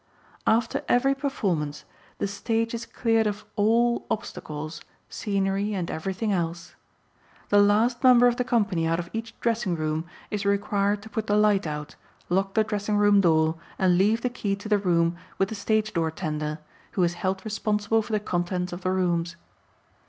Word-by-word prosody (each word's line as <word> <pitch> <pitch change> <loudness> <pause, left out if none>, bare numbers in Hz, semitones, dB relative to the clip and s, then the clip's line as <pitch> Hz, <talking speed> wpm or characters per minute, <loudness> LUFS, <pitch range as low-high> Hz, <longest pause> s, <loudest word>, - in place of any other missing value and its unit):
After 225 +1 +2
every 265 +3 +4
performance 190 - -2 0.3
the - - -1
stage 225 +3 -1
is 230 0 -5
cleared 225 -2 +1
of 210 0 -4
all 235 +3 +2
obstacles, 155 -6 -5 0.3
scenery 200 0 -1
and 175 -3 -3
everything 190 +6 -2
else. 170 -2 -2 0.8
The 205 0 +6
last 225 +5 +3
member 250 -1 +7
of 245 -1 +3
the 250 - +1
company 205 -9 +1
out 165 0 +1
of 170 0 -5
each 225 0 -6
dressing 230 -6 0
room 155 0 -2 0.3
is 210 -1 -2
required 200 0 +1
to 220 - -10
put 220 -2 -3
the 205 - +2
light 210 -4 +3
out, 150 -1 -5 0.3
lock 195 +2 0
the 220 - +4
dressing 210 -1 -1
room 205 -1 +5
door 160 -2 +3 0.2
and 185 -2 +3
leave 215 +4 +3
the 250 - 0
key 205 -5 -2
to 200 +2 -9
the 210 -1 +3
room 170 -3 +1 0.2
with 195 - +1
the - - -4
stage 215 +1 0
door 165 -1 +1
tender 155 -2 -3 0.4
who 185 - +2
is 175 0 +2
held 190 +1 -1
responsible 215 +1 0
for 220 +1 -7
the 215 - +2
contents 180 -2 -2
of 175 - -6
the 185 - -1
rooms. 175 -2 0
200 Hz, 175 wpm, -26 LUFS, 175-220 Hz, 0.8 s, member